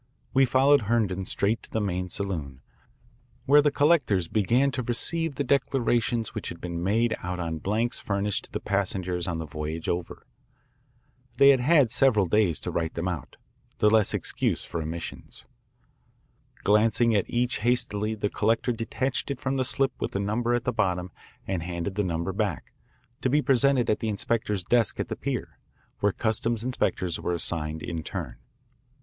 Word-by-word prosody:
We 135 0 +5
followed 135 +3 +4
Herndon 100 -5 +1
straight 105 +5 0
to - - -14
the 110 - -1
main 90 -3 -2
saloon, 80 -10 -4 0.8
where 145 +2 +6
the 145 - +3
collectors 145 - +2
began 120 +9 +2
to 130 - -2
receive 145 +6 0
the 140 - -1
declarations 120 -4 +1
which - - -5
had 85 - -8
been 85 -1 -5
made 110 +5 +1
out 90 0 -4
on 80 -2 -3
blanks 110 +8 -1
furnished 100 0 -1
to - - -16
the - - -3
passengers 90 -3 -1
on 85 -2 -2
the 80 - -4
voyage 75 +2 -5
over. 85 -1 -3 1.1
They 140 - +7
had 135 -2 +6
had 140 -2 +4
several 120 -6 +3
days 90 -3 +2
to - - -3
write 80 -1 -2
them 85 +2 -2
out 85 -8 -5 0.4
the 105 - +4
less 110 -2 +3
excuse - - -1
for 85 - -4
omissions. 80 +2 -7 1.2
Glancing 110 +3 +3
at 100 -3 +1
each 120 0 0
hastily 110 -2 +1
the 105 -1 -1
collector 115 +4 +1
detached 130 +4 -2
from 135 +1 -2
it - - -1
the 130 - +1
slip 135 +1 +2
with - - -2
the 100 - -1
number 115 +4 0
at 120 - -1
the 125 - -1
bottom 90 -4 -1 0.3
and 95 -3 -2
handed 85 +3 -4
the 105 +1 0
number 85 +1 -2
back, - - -3 0.5
to 130 - +1
be 145 +3 +3
presented 135 -2 +3
at 105 - +1
the 110 - -2
inspector's 105 -1 -1
desk 115 +2 +2
at - - -2
the - - -3
pier, - - -4 0.4
where 105 - +2
customs 115 +1 0
inspectors 95 -8 -1
were 90 - -2
assigned 80 -2 -2
in 85 -2 -4
turn. 80 - -6
105 Hz, 175 wpm, -26 LUFS, 90-120 Hz, 1.2 s, They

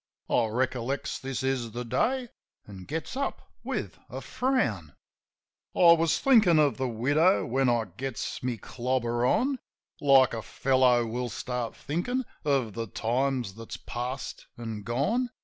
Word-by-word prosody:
I 115 - +3
recollects 130 +3 -2
this 135 0 -4
is 130 -3 0
the 120 0 -4
day, 245 - 0 0.4
an' 95 -3 -10
gets 160 - -4
up 275 +1 -4
with - - -4
a - - -5
frown. 125 - -1 0.8
I 170 -1 +8
was 165 -1 +2
thinkin' 220 -11 +5
of 150 -2 +3
the 130 - -1
widow 145 - +3
while 130 +2 +1
I 120 -2 +2
gets 115 +7 -5
me 125 -2 -2
clobber 120 +1 -1
on 265 - +1 0.2
— - - -55
Like 135 -3 +6
a 115 - -3
feller 125 -1 +3
will 120 +2 -3
start 125 0 -4
thinkin' 245 - -2 0.2
of 135 -7 +1
the 115 -1 -4
times 125 0 -1
that's 115 +2 -8
past 125 +3 -5
an' 115 -3 -5
gone. 145 - 0
130 Hz, 150 wpm, -28 LUFS, 115-150 Hz, 0.8 s, I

